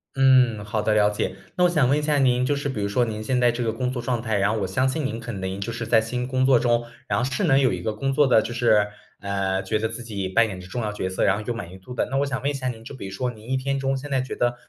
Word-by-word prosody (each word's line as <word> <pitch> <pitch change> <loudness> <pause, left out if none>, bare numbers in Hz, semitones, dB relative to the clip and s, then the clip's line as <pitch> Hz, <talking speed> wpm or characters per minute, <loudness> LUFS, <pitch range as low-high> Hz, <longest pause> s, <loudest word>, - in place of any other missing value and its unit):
嗯， 130 -5 +4
好 105 +1 -2
的， 110 - +2
了 105 -1 +4
解。 105 - -2 0.2
那 180 - +2
我 180 - +5
想 150 -7 +2
问 140 - +3
一 - - 0
下 150 -1 +2
您， 125 -2 +3
就 145 - +1
是 140 0 -3
比 130 - -4
如 - - 0
说 110 +5 +1
您 110 -2 -3
现 125 +3 0
在 120 -1 +5
这 120 +1 -3
个 110 -1 -1
工 125 +2 -2
作 130 - -4
状 120 -1 -1
态， 110 -3 -1
然 100 +1 +2
后 110 - -1
我 95 - -1
相 125 +8 +1
信 150 +4 -1
您 115 -3 -5
可 115 +1 -6
能 95 -2 -4
就 105 +4 -4
是 115 -1 -4
在 115 -1 +5
新 125 +2 -3
工 130 0 +1
作 130 -2 +5
中， 120 -1 +1 0.2
然 - - 0
后 125 - +1
是 165 +9 -1
能 135 -4 +4
有 130 -6 +3
一 90 - -4
个 110 - -2
工 135 +6 -2
作 145 +1 +4
的 125 - +5
就 120 - -5
是， 110 -3 +3 0.3
呃， 95 -1 -1
觉 95 +3 -1
得 110 +1 -1
自 120 - -7
己 100 -5 -4
扮 115 +4 +3
演 95 -3 -7
着 90 - -11
重 120 +6 -4
要 105 -1 -2
角 95 -3 -3
色， 95 - -1
然 95 - +4
后 105 - -5
有 120 - 0
满 90 -6 -7
意 95 - -11
度 125 +7 -10
的。 - - 0
那 135 - 0
我 140 +1 +1
想 135 -1 -2
问 140 - +1
一 - - -5
下 130 -2 -3
您， 115 -3 -5
就 130 - -8
比 120 -8 -7
如 - - -8
说 125 +6 -2
您 110 0 -13
一 130 - +1
天 135 +1 -1
中 135 0 0
现 140 +2 -8
在 135 -1 +2
觉 130 - -5
得 120 0 +1
120 Hz, 370 characters per minute, -24 LUFS, 105-130 Hz, 0.3 s, 我